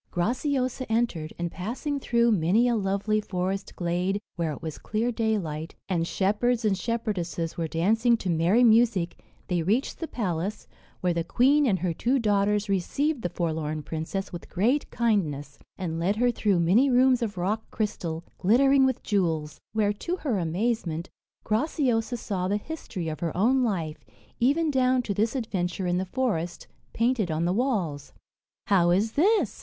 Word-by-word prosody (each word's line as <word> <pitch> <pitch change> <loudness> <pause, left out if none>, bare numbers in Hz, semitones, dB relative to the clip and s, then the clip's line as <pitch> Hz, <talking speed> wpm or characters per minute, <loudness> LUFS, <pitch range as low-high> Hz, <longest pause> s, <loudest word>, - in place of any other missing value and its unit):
Graciosa 255 - -1
entered, 220 -9 0
and 170 -1 -3
passing 255 +9 -3
through 235 -2 +2
many 205 +5 +3
a 240 - +2
lovely 200 +1 0
forest 190 0 -3
glade, 180 +3 -1 0.2
where 165 -2 -1
it 145 - -6
was 160 -2 -5
clear 225 +3 -1
daylight, 190 -9 -2
and 170 -3 0
shepherds 220 +6 +1
and 205 -2 +3
shepherdesses 185 -7 -2
were 165 -1 -2
dancing 225 +9 +2
to 195 - -6
merry 170 +9 +3
music, 220 -6 +3 0.2
they 175 -2 0
reached 215 - 0
the 330 - -3
palace, 195 - -3 0.3
where 180 -1 +1
the 170 0 -1
queen 275 - +3
and 195 -5 +2
her 175 -1 -1
two 250 +10 +1
daughters 210 -2 +1
received 250 - 0
the 175 - -2
forlorn 155 -3 -2
princess 165 +6 -4
with 175 - -8
great 240 +11 +1
kindness, 155 - -1 0.2
and 165 -3 -3
led 185 +5 +1
her 245 +2 +2
through 205 -5 +1
many 200 +12 +4
rooms 255 0 +4
of 210 -4 -3
rock 205 +5 -2
crystal, 170 -6 -3 0.2
glittering 265 +7 +5
with 260 - -2
jewels, 165 -7 -1
where, 210 -2 +1
to 340 - -3
her 270 - -1
amazement, 175 -1 -2 0.3
Graciosa 245 -1 0
saw 190 -5 -2
the 205 +2 +1
history 210 - -6
of 155 -1 -4
her 170 -1 -3
own 255 +7 +3
life, 170 -9 -2 0.4
even 295 +6 +2
down 255 -1 +2
to 205 - -2
this 220 +5 0
adventure 190 -6 -2
in 180 0 +1
the 190 - -2
forest, 180 -8 -2 0.3
painted 230 -4 +1
on 160 +1 0
the 175 - +1
walls. 185 - -1 0.5
"How 180 -4 +4
is 200 +6 +2
this?" 405 - +2
205 Hz, 165 wpm, -26 LUFS, 175-240 Hz, 0.5 s, glittering